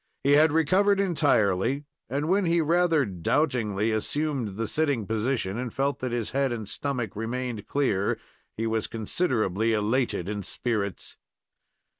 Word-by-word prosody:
He 140 - +3
had 150 +2 +6
recovered 190 +6 +3
entirely, 135 - +2 0.3
and 140 +4 -1
when 195 +2 +2
he 170 0 +2
rather 165 -2 +3
doubtingly 105 - 0
assumed 120 -2 -1
the 115 0 -1
sitting 140 -5 0
position 110 -1 -1
and 125 -2 -4
felt 140 +3 -1
that 130 -1 -3
his 120 -2 -2
head 135 -1 +1
and 110 -4 -4
stomach 125 -3 -3
remained 115 0 -4
clear 105 -9 +1 0.4
he 115 - -1
was 110 -1 -1
considerably 115 - 0
elated 110 -3 0
in 105 0 -3
spirits. 100 0 -3
120 Hz, 140 wpm, -26 LUFS, 110-145 Hz, 0.4 s, had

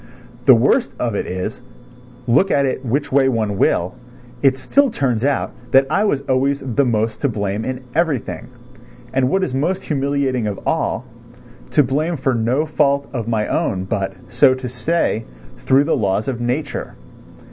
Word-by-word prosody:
The - - +9
worst - - +2
of 120 -3 -1
it 100 - -2
is, 95 +6 -4 0.6
look 130 +11 +3
at 140 -4 +2
it 130 0 -2
which 140 +4 -1
way 135 0 +4
one 110 -5 -1
will, 90 +1 +2 0.5
it 135 -1 +3
still 275 - +2
turns 125 - -1
out 140 0 0 0.2
that 135 0 +6
I 205 - +2
was 145 -10 +1
always 135 +1 +1
the 135 +2 0
most 110 -2 -1
to 140 - +2
blame 105 -1 -2
in 130 +1 -4
everything. 160 -5 -1 0.7
And 130 -1 +2
what 190 +5 +1
is 130 - -2
most 170 +8 -1
humiliating 140 -5 0
of 100 -2 -4
all, - - -1 0.6
to 150 - +4
blame 155 +6 -1
for 135 0 0
no 120 +6 +1
fault 140 -2 +1
of 115 -4 -3
my 110 -2 0
own 95 -1 -1
but, 95 -1 -2 0.2
so 130 +2 +4
to 130 -1 -6
say, 125 -1 -1 0.4
through 135 +2 +3
the 155 - +1
laws 105 -2 0
of 125 -3 -3
nature. 130 +5 -3
130 Hz, 170 wpm, -19 LUFS, 115-140 Hz, 0.7 s, The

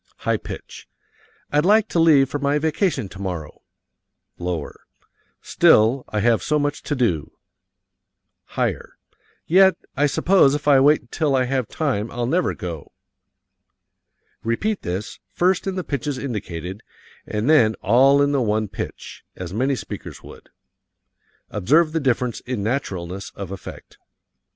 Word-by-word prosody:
(High - - 0
pitch) - - -10 0.6
"I'd 150 +1 +3
like 215 +4 +4
to 170 - 0
leave 150 -5 +5
for 145 - -4
my 140 +1 +1
vacation 155 - 0
tomorrow, 90 -5 -6 0.8
(lower) 85 -4 -5 0.6
still, 115 +5 +4
I 105 - -1
have 115 0 +3
so 150 - 0
much 145 0 -1
to 145 - -3
do. 90 - -1 1.2
(Higher) - - -2 0.5
Yet 190 +2 +5 0.2
I 145 +2 +3
suppose 145 -2 +3
if 145 0 -5
I 140 -2 +6
wait 145 +3 +4
until 140 +3 -1
I 130 - +3
have 130 -2 -1
time 120 -9 -2
I'll 120 0 -3
never 175 +9 0
go." 85 -4 -7 1.5
Repeat 195 - -1
this, 95 +4 -5
first 185 +2 +1
in 190 - -2
the 185 - -3
pitches 140 -2 -3
indicated, 95 - -5 0.5
and 105 +3 -2
then 115 -9 +5
all 135 +6 +5
in 140 - +1
the 140 -2 +1
one 110 -2 0
pitch, 100 - -7
as 90 -1 -7
many 130 +6 +1
speakers 100 -6 -8
would. - - -14 1.0
Observe 155 - +3
the 165 - 0
difference 125 -4 0
in 125 -5 -4
naturalness 100 -6 -3
of 100 -2 -7
effect. 95 - -10
130 Hz, 140 wpm, -22 LUFS, 105-150 Hz, 1.5 s, I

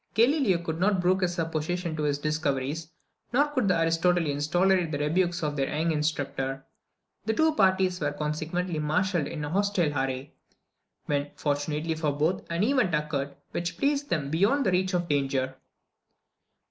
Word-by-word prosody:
Galileo 235 - +4
could 160 -1 -3
not 195 +1 +2
brook 185 +1 +2
this 180 -1 -1
opposition 165 +1 -2
to 155 - -3
his 145 -1 +1
discoveries; 150 0 -2 0.4
nor 285 +5 +3
could 255 -8 0
the 180 -3 +3
Aristotelians 165 -3 +1
tolerate 180 0 +3
the 145 - -1
rebukes 170 +4 0
of 150 -1 -1
their 135 -2 0
young 160 +3 0
instructor. 140 -3 -2 0.6
The 220 - +1
two 315 +3 +3
parties 190 -5 +2
were, 145 -1 0
consequently, 155 +3 -2
marshalled 155 +2 +1
in 150 - -5
hostile 175 -1 0
array; 135 0 -2 0.7
when, 145 0 -1
fortunately 150 +2 -1
for 155 -2 -1
both, 155 +6 0
an 170 +3 0
event 240 - +2
occurred, 145 -2 -2 0.2
which 170 0 -3
placed 285 +5 0
them 145 -3 -1
beyond 210 - +2
the 190 - +3
reach 185 +1 +1
of 175 -1 0
danger. 135 -3 0
165 Hz, 160 wpm, -27 LUFS, 145-185 Hz, 0.7 s, Galileo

